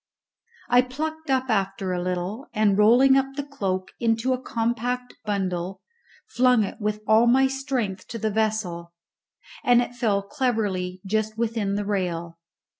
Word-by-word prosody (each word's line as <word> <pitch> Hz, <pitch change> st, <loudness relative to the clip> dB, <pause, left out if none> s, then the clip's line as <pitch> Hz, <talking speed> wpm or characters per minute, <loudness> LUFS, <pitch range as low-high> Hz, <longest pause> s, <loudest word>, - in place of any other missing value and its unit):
I 245 Hz, 0 st, +5 dB
plucked 310 Hz, +5 st, -5 dB
up 260 Hz, -1 st, +1 dB
after 195 Hz, -2 st, -1 dB
a 180 Hz, -, -2 dB
little, 185 Hz, +7 st, -3 dB
and, 210 Hz, -2 st, +3 dB
rolling 245 Hz, +6 st, +6 dB
up 270 Hz, 0 st, +1 dB
the 285 Hz, -, -3 dB
cloak 190 Hz, -9 st, -3 dB
into 230 Hz, +2 st, +1 dB
a 255 Hz, -, -3 dB
compact 245 Hz, +1 st, -2 dB
bundle, 190 Hz, -3 st, -2 dB, 0.4 s
flung 250 Hz, -2 st, +3 dB
it 200 Hz, -, -6 dB
with 210 Hz, 0 st, -1 dB
all 220 Hz, +2 st, +5 dB
my 265 Hz, +3 st, +5 dB
strength 265 Hz, -8 st, -2 dB
to 230 Hz, -, -6 dB
the 220 Hz, -1 st, -1 dB
vessel, 200 Hz, -6 st, -1 dB, 0.7 s
and 245 Hz, -1 st, +5 dB
it 245 Hz, 0 st, -1 dB
fell 215 Hz, -5 st, 0 dB
cleverly 200 Hz, -7 st, -1 dB
just 215 Hz, +2 st, -1 dB
within 220 Hz, -3 st, -1 dB
the 205 Hz, 0 st, -2 dB
rail. 170 Hz, -4 st, -2 dB
220 Hz, 150 wpm, -24 LUFS, 195-250 Hz, 0.7 s, rolling